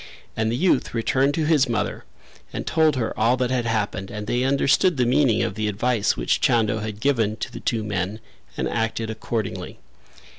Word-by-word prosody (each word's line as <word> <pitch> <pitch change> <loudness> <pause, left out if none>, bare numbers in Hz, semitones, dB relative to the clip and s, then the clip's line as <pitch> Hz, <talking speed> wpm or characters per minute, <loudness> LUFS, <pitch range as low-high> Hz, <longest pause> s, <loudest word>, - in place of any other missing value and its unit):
And 110 0 0
the 120 - -1
youth 160 -6 +1
returned 135 +5 +1
to 160 - 0
his 150 -4 +3
mother 105 -3 -2 0.5
and - - -5
told 160 -2 +3
her 120 -4 -1
all 115 +4 +3
that 125 -1 0
had 125 -2 0
happened 105 -4 -2
and 105 0 -6
they 120 +3 0
understood 140 +5 +3
the 125 - +2
meaning 120 -2 +3
of - - -2
the 110 -1 -2
advice 105 +1 0
which - - 0
Chando 110 -2 +2
had 105 -1 -5
given 115 -5 +1
to - - -5
the - - -7
two 115 -3 -1
men 100 0 -3 0.4
and - - -1
acted 115 0 -2
accordingly. 110 -2 -4
115 Hz, 190 wpm, -23 LUFS, 110-130 Hz, 0.5 s, his